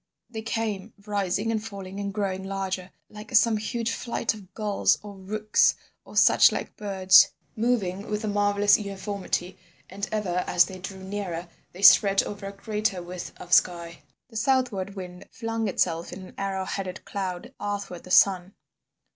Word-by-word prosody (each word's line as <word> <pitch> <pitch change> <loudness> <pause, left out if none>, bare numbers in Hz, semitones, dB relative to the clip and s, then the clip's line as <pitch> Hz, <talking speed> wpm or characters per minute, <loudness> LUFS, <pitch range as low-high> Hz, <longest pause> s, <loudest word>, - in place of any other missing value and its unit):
They 220 -2 -5
came, 220 -2 -3
rising 205 +1 -1
and 220 -1 -1
falling 200 -3 -7
and 200 0 -3
growing 195 -2 -2
larger, 190 -1 -3 0.2
like 215 +4 -8
some 225 0 +5
huge 230 +2 -2
flight 235 -1 -1
of 200 -4 -13
gulls 210 -2 +2
or 205 -1 -8
rooks 210 +3 +2 0.3
or - - -9
such - - +7
like - - -5
birds, 190 -2 +5 0.3
moving 215 -5 -1
with 210 +1 -2
a - - -2
marvellous 205 0 +3
uniformity, 195 -2 -4 0.3
and 200 +1 -4
ever 185 -5 -1
as 175 - +5
they 185 -1 -9
drew 190 0 -8
nearer 190 -3 -5 0.2
they 190 +3 -10
spread 195 0 +7
over 205 -1 -6
a - - -5
greater 205 -2 -2
width 180 0 -7
of 175 - -5
sky. 170 -1 +2 0.3
The 225 - -7
southward 215 -6 0
wind 180 -2 -9
flung 225 -2 -3
itself 170 -3 0
in 190 - -8
an - - -14
arrow 195 -1 -2
headed 190 -2 -5
cloud 185 -3 -5
athwart 200 -3 -4
the - - -12
sun. 185 0 +4
200 Hz, 165 wpm, -26 LUFS, 185-210 Hz, 0.3 s, such